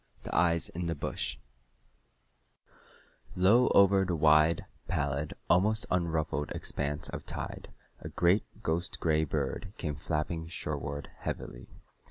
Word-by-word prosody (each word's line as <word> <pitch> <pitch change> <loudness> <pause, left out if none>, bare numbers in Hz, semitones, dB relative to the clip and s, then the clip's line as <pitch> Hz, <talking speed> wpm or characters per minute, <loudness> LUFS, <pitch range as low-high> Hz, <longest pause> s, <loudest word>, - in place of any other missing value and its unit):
The - - -5
Eyes 85 -1 +3
in 85 0 -4
the 85 - -1
Bush 65 -2 -2 2.0
Low 105 +7 +5
over 100 0 +5
the 90 -2 -1
wide, 75 +1 +4 0.2
pallid, 70 +1 -1 0.2
almost 105 +5 +3
unruffled 80 -4 0
expanse 75 +1 -2
of - - -6
tide - - -6 0.3
a - - -7
great 95 +4 +1
ghost 85 +3 -1
gray 80 -1 +2
bird 75 +6 -3
came 75 -4 -2
flapping 80 +3 -3
shoreward 70 -3 -4
heavily. - - -6
80 Hz, 120 wpm, -30 LUFS, 75-90 Hz, 2.0 s, Low